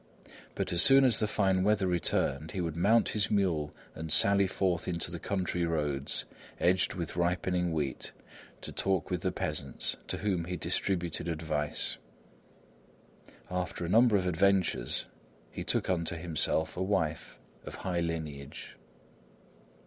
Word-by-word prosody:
But -, -, -2 dB
as 85 Hz, -, +6 dB
soon 135 Hz, 0 st, +8 dB
as 125 Hz, -, +3 dB
the 110 Hz, -, +1 dB
fine 95 Hz, -3 st, +1 dB
weather 105 Hz, 0 st, +2 dB
returned, 85 Hz, -3 st, 0 dB
he 95 Hz, -, -3 dB
would 85 Hz, -3 st, -2 dB
mount 105 Hz, +7 st, +3 dB
his 105 Hz, -1 st, 0 dB
mule 85 Hz, -8 st, +1 dB, 0.2 s
and 80 Hz, 0 st, -6 dB
sally 100 Hz, +3 st, +6 dB
forth 90 Hz, -2 st, -1 dB
into 85 Hz, -2 st, -2 dB
the 85 Hz, -, -5 dB
country 90 Hz, -1 st, -2 dB
roads, 75 Hz, -4 st, -1 dB, 0.3 s
edged 90 Hz, +1 st, +2 dB
with 85 Hz, -3 st, -5 dB
ripening 90 Hz, 0 st, 0 dB
wheat, 75 Hz, -5 st, -2 dB, 0.5 s
to -, -, -6 dB
talk 95 Hz, -1 st, -1 dB
with 90 Hz, -2 st, -1 dB
the -, -, 0 dB
peasants, -, -, -3 dB
to -, -, -2 dB
whom 95 Hz, -5 st, -1 dB
he 90 Hz, +1 st, -4 dB
distributed 85 Hz, 0 st, -1 dB
advice. 80 Hz, -3 st, -2 dB, 1.5 s
After 90 Hz, -1 st, -3 dB
a -, -, -4 dB
number 115 Hz, +2 st, +5 dB
of 95 Hz, -, -1 dB
adventures 90 Hz, -6 st, +1 dB, 0.5 s
he -, -, -5 dB
took -, -, 0 dB
unto 85 Hz, -2 st, 0 dB
himself 80 Hz, -1 st, -1 dB
a 90 Hz, -, -4 dB
wife 80 Hz, -5 st, -1 dB, 0.3 s
of -, -, -8 dB
high 90 Hz, -2 st, -2 dB
lineage. 80 Hz, -4 st, -5 dB
90 Hz, 145 wpm, -30 LUFS, 80-95 Hz, 1.5 s, soon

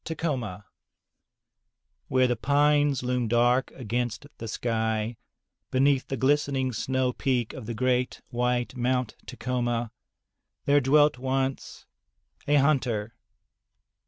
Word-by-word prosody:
Tacoma 130 Hz, -, -3 dB, 1.5 s
^ -, -, -3 dB
There 130 Hz, -, +5 dB
the 125 Hz, -1 st, +1 dB
pines 145 Hz, +1 st, +2 dB
loom 125 Hz, -1 st, 0 dB
dark 120 Hz, +3 st, +3 dB
against 120 Hz, 0 st, -3 dB
the 115 Hz, -, -5 dB
sky, 110 Hz, 0 st, -1 dB, 0.5 s
beneath 135 Hz, +1 st, +2 dB
the 135 Hz, -, -3 dB
glistening 135 Hz, -1 st, +1 dB
snow 130 Hz, +2 st, 0 dB
peak 125 Hz, -4 st, -1 dB
of 120 Hz, -5 st, -8 dB
the 115 Hz, -, -4 dB
great 125 Hz, +1 st, 0 dB
white 125 Hz, +1 st, 0 dB
Mt. 125 Hz, -1 st, 0 dB
Ta -, -, -8 dB
coma, 120 Hz, -2 st, -1 dB, 0.7 s
there 145 Hz, 0 st, +4 dB
dwelt 145 Hz, 0 st, +4 dB
once 135 Hz, +1 st, -2 dB, 0.6 s
a 145 Hz, -, +3 dB
hunter. 125 Hz, -7 st, +1 dB
125 Hz, 115 wpm, -27 LUFS, 120-135 Hz, 1.5 s, There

